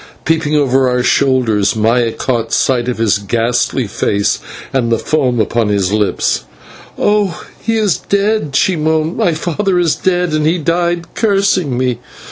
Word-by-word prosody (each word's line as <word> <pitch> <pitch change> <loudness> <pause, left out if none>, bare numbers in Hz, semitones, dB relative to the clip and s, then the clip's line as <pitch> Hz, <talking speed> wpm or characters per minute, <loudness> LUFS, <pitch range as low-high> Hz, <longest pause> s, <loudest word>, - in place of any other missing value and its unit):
Peeping 155 -2 +1
over 135 -3 +2
our 125 0 0
shoulders, 120 -8 +2
Maya 115 +2 +2
caught 115 -1 -2
sight 125 -2 +1
of 125 - -3
his 110 -3 +1
ghastly 120 +4 0
face 100 0 -1 0.3
and 120 -3 0
the 115 - +3
foam 130 -3 0
upon 110 +1 0
his 100 -1 0
lips. 105 -10 0 0.5
"Oh, 205 -4 0 0.2
he 225 0 0
is 210 -6 +1
dead," 200 -7 -1
she 185 +5 +2
moaned; 160 +1 0
"my 170 -3 +1
father 180 +4 -1
is 170 -3 +2
dead, 180 -3 0
and 155 0 +1
he 170 +3 +2
died 170 +1 -1
cursing 195 - +1
me." 125 -2 -1
140 Hz, 155 wpm, -15 LUFS, 115-175 Hz, 0.5 s, the